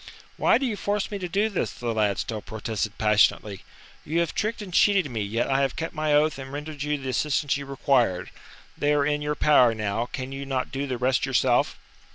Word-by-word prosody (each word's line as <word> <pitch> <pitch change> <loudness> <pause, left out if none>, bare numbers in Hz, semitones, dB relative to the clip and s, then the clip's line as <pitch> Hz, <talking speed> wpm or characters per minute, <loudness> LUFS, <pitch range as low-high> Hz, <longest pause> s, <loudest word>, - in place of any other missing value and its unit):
"Why - - +4
do 270 - -2
you 230 -4 -1
force 205 +1 -2
me 205 - -4
to 180 -2 -4
do 200 +5 +1
this?" 185 - -2
the 120 +4 -4
lad 105 -3 +1
still 110 -2 -3
protested 110 -1 -4
passionately. 105 -2 +2 0.4
"You 160 +3 -1
have 170 - -2
tricked 220 +2 -2
and 195 -4 -8
cheated 190 -7 +3
me, 110 -2 -2
yet 110 +4 -1
I 135 0 +2
have 135 - 0
kept 165 - -4
my 155 -2 -1
oath 150 0 +3
and 135 0 -8
rendered 150 0 -6
you 150 +1 0
the 135 -2 -6
assistance 145 +3 0
you 140 0 -5
required. 130 -9 +1 0.4
They 145 0 +1
are 145 -1 +2
in 150 0 0
your 150 0 -1
power 125 -6 +4
now, 110 +2 -2
can 130 0 -6
you 135 0 -5
not 135 -2 -2
do 140 +1 -3
the 130 -2 -2
rest 130 +2 +1
yourself?" 130 -3 +2
140 Hz, 220 wpm, -25 LUFS, 115-155 Hz, 0.4 s, Why